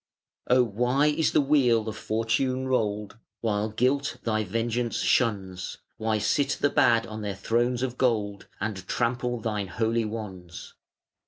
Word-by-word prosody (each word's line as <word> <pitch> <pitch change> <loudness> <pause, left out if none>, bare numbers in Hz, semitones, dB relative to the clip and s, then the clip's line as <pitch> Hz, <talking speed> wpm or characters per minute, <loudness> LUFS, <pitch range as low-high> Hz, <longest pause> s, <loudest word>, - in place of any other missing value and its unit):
Oh! 125 0 +5
why 125 +6 +1
is 150 +1 +1
the - - +4
wheel 125 -6 +3
of 110 - -4
Fortune 115 +5 -1
rolled, 105 -4 -1 0.2
While 105 -1 0
guilt 130 +6 0
Thy 110 -1 0
vengeance 115 +4 -1
shuns? 95 -7 0 0.2
Why 110 0 0
sit 135 +7 +1
the 145 - +2
bad 115 -1 +4
on 110 0 -7
their 100 -2 -3
thrones 120 +5 0
of 125 -1 -3
gold, 105 -6 0
And 100 -4 -4
trample 120 0 -1
Thine 105 -3 -2
holy 115 +4 0
ones? 95 -6 -7
115 Hz, 145 wpm, -27 LUFS, 105-125 Hz, 0.2 s, Oh